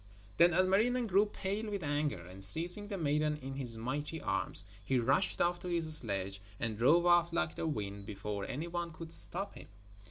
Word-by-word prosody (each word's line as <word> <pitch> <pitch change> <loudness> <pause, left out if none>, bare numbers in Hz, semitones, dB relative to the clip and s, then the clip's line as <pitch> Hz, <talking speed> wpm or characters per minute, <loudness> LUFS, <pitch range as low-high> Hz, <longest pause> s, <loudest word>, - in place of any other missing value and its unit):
Then 170 +1 +6
Ilmarinen 210 +7 +2
grew 200 0 +3
pale 205 +2 -4
with 200 -3 -4
anger, 145 - -2
and 95 +2 -8
seizing 175 - +4
the 205 -2 -4
maiden 150 -1 0
in 135 -1 -7
his 125 -4 +1
mighty 145 +7 -4
arms 95 -2 0 0.2
he 130 +6 0
rushed 135 +9 +1
off 175 0 +1
to - - -8
his 165 -3 +1
sledge 100 -6 -1 0.2
and 115 -2 -2
drove 150 +10 +4
off 175 -1 +4
like 165 -2 -1
the 165 - -4
wind 100 -7 -4
before 105 -1 -5
any 155 +6 -4
one 170 0 -4
could 165 0 -10
stop 195 +4 +1
him. - - -12
155 Hz, 190 wpm, -33 LUFS, 115-175 Hz, 0.2 s, Then